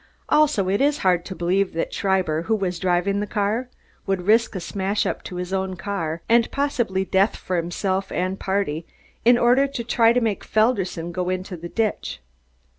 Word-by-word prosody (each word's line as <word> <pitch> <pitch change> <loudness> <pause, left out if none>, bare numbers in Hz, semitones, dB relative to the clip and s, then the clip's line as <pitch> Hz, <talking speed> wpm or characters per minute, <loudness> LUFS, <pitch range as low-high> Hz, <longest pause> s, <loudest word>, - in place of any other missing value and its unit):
Also, 300 -11 +3
it 200 +5 +1
is 290 +1 +3
hard 180 -2 +3
to 190 - -6
believe 185 +3 0
that 165 - -2
Schreiber, 185 -5 +1
who 220 +6 0
was 185 -4 -2
driving 185 +3 +1
the 205 - -2
car, 215 +5 -1 0.4
would 195 -2 0
risk 225 +1 +3
a - - -2
smash 195 +3 -1
up - - -2
to 180 - -7
his 180 +1 -4
own 190 -1 -1
car 170 -3 -4
and 230 0 +4
possible 240 -9 0
death 190 +2 +2
for 185 - -4
himself 185 +3 -1
and 185 +2 -2
party, 190 -5 -1 0.4
in 240 +1 +7
order 250 +4 +4
to 270 -4 -5
try 230 0 +4
to 245 - +3
make 225 -4 -1
Felderson 195 -7 0
go 180 +1 -2
into 185 +1 -3
the 170 0 -8
ditch. 220 - -2
195 Hz, 190 wpm, -23 LUFS, 180-225 Hz, 0.4 s, in